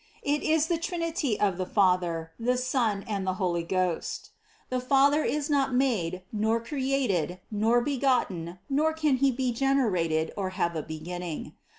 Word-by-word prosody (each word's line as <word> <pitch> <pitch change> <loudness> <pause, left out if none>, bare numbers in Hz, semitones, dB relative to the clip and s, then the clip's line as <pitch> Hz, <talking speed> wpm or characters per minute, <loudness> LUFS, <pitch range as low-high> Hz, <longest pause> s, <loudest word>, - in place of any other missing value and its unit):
It 290 +1 +1
is 315 -1 +2
the 330 0 0
Trinity 335 - -1
of 195 -4 +1
the 185 - 0
Father, 175 -4 +1
the 250 +2 +1
Son 240 -5 0
and 200 -3 -2
the 185 - 0
Holy 175 -2 0
Ghost. 180 0 -2 0.4
The 255 - 0
Father 280 +4 +4
is 295 -1 -1
not 275 -3 +1
made, 185 -9 0
nor 220 +2 +1
created, 245 - -1
nor 225 +3 +3
begotten, 240 - 0
nor 305 +3 +2
can 305 -4 +1
He 275 +1 +3
be 255 0 -1
generated 195 -12 +1
or 195 -2 -2
have 170 -3 0
a 160 - -1
beginning. 160 +2 -6
230 Hz, 160 wpm, -28 LUFS, 180-275 Hz, 0.4 s, Father